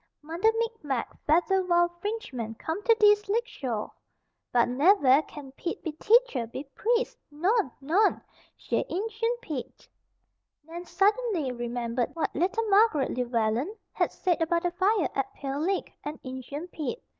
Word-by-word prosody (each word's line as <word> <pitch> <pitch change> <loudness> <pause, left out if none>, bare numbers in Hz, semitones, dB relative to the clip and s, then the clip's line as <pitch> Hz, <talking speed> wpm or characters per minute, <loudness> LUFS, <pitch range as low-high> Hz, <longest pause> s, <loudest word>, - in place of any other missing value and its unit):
Mudder 335 +8 +2
Micmac, 435 - -2
fadder 355 +5 +3
wild 345 -1 +3
Frinchman 255 - -4
come 320 - -3
to 460 -2 +6
dees 415 -1 +5
lakeshore. 350 - -2 0.6
But 240 -1 +4
nev 290 +8 +4
air 265 +3 +7
can 290 -3 -11
Pete 340 +5 -5
be 320 - -2
Teacher, 420 - +3
be 260 +4 -6
priest. 480 +2 0
Non, 355 - +1
non! 355 +10 +3 0.4
Jes' - - -1
Injun 450 +5 -1
Pete." 290 - -6 0.8
Nan 335 +3 -8
suddenly 390 - +1
remembered 240 +1 -2
what 325 - -2
little 390 +8 0
Margaret 395 - +4
Llewellen 240 - 0 0.2
had - - 0
said 355 -3 0
about 335 +1 +1
the 355 - 0
fire 385 +1 +2
at 270 -1 -2
Pale 275 0 -4
Lick, 375 +5 -1
and 300 +1 -6
"Injun 260 +5 -6
Pete." 335 - -4
335 Hz, 145 wpm, -28 LUFS, 270-415 Hz, 0.8 s, air